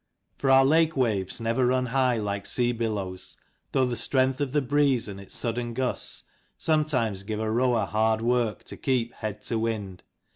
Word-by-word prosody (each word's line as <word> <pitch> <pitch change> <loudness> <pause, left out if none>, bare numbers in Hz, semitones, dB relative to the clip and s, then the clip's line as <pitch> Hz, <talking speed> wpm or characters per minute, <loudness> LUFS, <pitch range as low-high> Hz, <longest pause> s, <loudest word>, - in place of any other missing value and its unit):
For 135 - 0
our 135 0 +7
lake 160 +2 +3
waves 105 -7 0
never 115 +2 +1
run 130 0 +2
high 125 -1 +2
like 100 -2 -3
sea 120 -1 +2
billows, 105 -6 -4 0.3
though 130 -1 +3
the 125 -1 -2
strength 130 +3 +1
of 140 -3 -1
the 150 - +2
breeze 140 -3 +2
and 100 -1 -7
its 100 - -7
sudden 120 0 -2
gusts 130 0 -2 0.3
sometimes 135 -11 +1
give 105 +2 -4
a 110 0 -1
row 125 +2 +2
r 115 - +1
er - - -3
hard 110 +1 +1
work 120 -2 0
to - - -9
keep 125 -3 0
head 105 -1 -6
to 115 0 -1
wind. 105 -5 -3
120 Hz, 190 wpm, -26 LUFS, 110-130 Hz, 0.3 s, our